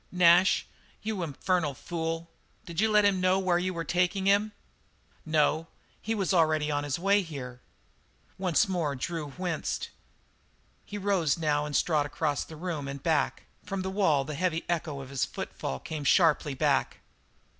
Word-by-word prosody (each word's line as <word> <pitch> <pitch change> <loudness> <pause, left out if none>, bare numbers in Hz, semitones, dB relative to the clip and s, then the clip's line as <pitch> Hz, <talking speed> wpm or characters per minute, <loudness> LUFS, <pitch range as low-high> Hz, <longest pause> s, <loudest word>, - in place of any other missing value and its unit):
"Nash 180 +1 +5 0.4
you 215 -3 -2
infernal 165 -1 -1
fool! 165 +1 -4 0.4
Did 170 +2 -2
you 220 - +3
let 210 -1 +5
him 195 -2 +3
know 185 +1 +3
where 185 -2 +2
you 185 +1 -1
were 170 -2 -3
taking 180 +3 0
him?" 205 +2 +3 0.8
"No. 155 +1 +2 0.3
He 225 +1 -2
was 195 -2 0
already 155 -3 +3
on 145 0 0
the 145 - -1
way 200 +3 +3
here." 130 -7 -8 0.8
Once 180 -3 +2
more 170 -7 -1
Drew 150 +2 -4
winced. 180 -4 -2 1.0
He 205 - -6
rose 190 -7 +1
now 150 -2 0
and 145 - -4
strode 150 -4 +2
across 150 0 -1
the 160 - -11
room 155 -4 -4
and 140 0 -6
back; 160 -3 +1 0.2
from 195 -1 -4
the 190 - -3
wall 175 -8 +2
the 155 - -5
heavy 170 +1 -1
echo 160 -5 -2
of 135 0 -10
his 135 -3 0
footfall 65 - -4
came 155 -2 -5
sharply 150 -1 +3
back. 140 -1 +1
165 Hz, 165 wpm, -28 LUFS, 150-185 Hz, 1.0 s, Nash